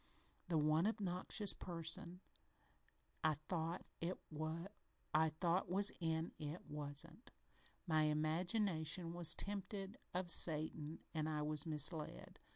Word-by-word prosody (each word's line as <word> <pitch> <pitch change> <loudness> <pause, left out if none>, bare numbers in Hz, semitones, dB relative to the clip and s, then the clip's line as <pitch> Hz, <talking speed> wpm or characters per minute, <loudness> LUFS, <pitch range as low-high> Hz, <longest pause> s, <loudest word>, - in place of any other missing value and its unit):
The 170 - +1
one 155 +4 +3
obnoxious 200 -1 -1
person 170 +1 -3 1.0
I 155 -1 +3
thought 170 0 -2 0.5
was 170 +2 0
in 160 -1 -1
it 150 +3 -6
wasn't. 150 - -3 0.6
My 155 -3 +2
imagination 165 +2 0
was 170 -2 +7
tempted 200 +2 -4 0.2
of 180 -1 0
Satan 155 -1 +2
an' 155 -1 -1
I 150 -1 -1
was 150 +1 0
misled. 155 +1 +2
165 Hz, 95 wpm, -40 LUFS, 155-180 Hz, 1.0 s, was